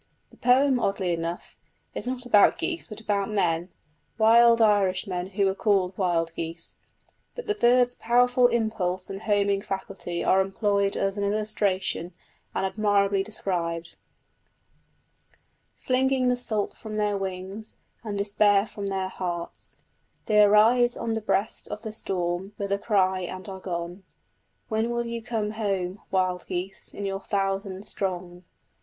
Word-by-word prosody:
The - - -19
poem, 260 +1 +4
oddly 195 -5 0
enough, 170 +1 -5 0.4
is - - -5
not 250 0 -3
about 210 -4 +5
geese 340 -1 -3
but 215 -2 -8
about 205 -2 -1
men 175 -4 0 0.5
wild 230 +1 +6
Irishmen 190 -4 +2
who 200 +1 0
were 190 - +2
called 195 -2 +1
Wild 170 -3 0
Geese; 165 0 -6 0.6
but 485 - -6
the 420 - +1
bird's 245 -4 +4
powerful 245 +1 +3
impulse 215 -6 -1
and 195 +1 -6
homing 200 -2 +1
faculty 190 -3 -4
are 190 - +4
employed 200 0 0
as 195 +1 -1
an 205 - -1
illustration, 200 -4 -1 0.4
and 190 - 0
admirably 200 0 +2
described: 175 -5 -3 1.8
Flinging 260 0 +2
the 250 - +3
salt 220 -4 -1
from 215 -1 -8
their 210 -1 +1
wings, 195 +2 -5 0.3
and 210 -3 -4
despair 205 0 +3
from 205 -2 -6
their 190 -1 -1
hearts 175 -2 -5 0.5
They 210 -1 +5
arise 225 +4 +5
on 230 -1 -2
the 220 - -2
breast 210 0 -1
of 210 - -7
the 220 -2 -5
storm 185 -1 -2
with 200 -1 -4
a 200 - +1
cry 190 -3 +2
and 185 +2 -6
are 190 -1 -7
gone. 175 0 -5 0.7
When 220 +1 0
will 235 0 -1
you 235 0 -4
come 220 -2 -2
home, 195 -3 -2
wild 185 -1 0
geese, 185 +2 -4
in 200 - -6
your 195 0 -3
thousand 195 0 -2
strong?... 180 -2 -4
200 Hz, 145 wpm, -26 LUFS, 185-220 Hz, 1.8 s, wild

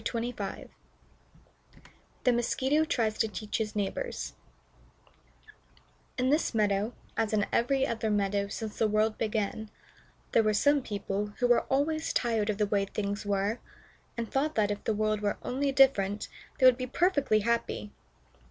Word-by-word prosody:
THE 250 - +4
MOSQUITO 265 +5 +1
TRIES 220 -7 0
TO 225 - +3
TEACH 210 +1 -4
HIS 215 -1 -3
NEIGHBORS 210 - -3 1.8
In 255 +1 +2
this 300 -5 +1
meadow, 210 +1 +1 0.2
as 220 -1 0
in 205 -1 +2
every 270 +3 +2
other 225 -1 -2
meadow 200 -1 +1
since 215 +1 -6
the 225 - +3
world 215 +1 +1
began, 215 0 -2 0.6
there - - +5
were 215 -1 +1
some 285 +6 +4
people 205 -2 -3
who 245 - +1
were 240 -1 +4
always 310 +4 0
tired 225 -3 +1
of 210 - 0
the 210 - +2
way 200 -1 +1
things 205 +1 -4
were, 200 +3 0 0.6
and 230 -1 -4
thought 295 +3 0
that, 210 -2 +2
if 205 - -4
the 220 - +1
world 215 0 0
were 205 -1 0
only 275 +2 0
different, 210 -7 +3 0.3
they 260 - +3
would 255 -1 +7
be 255 0 -3
perfectly 285 - +2
happy. 230 -2 -1
220 Hz, 150 wpm, -29 LUFS, 205-255 Hz, 1.8 s, would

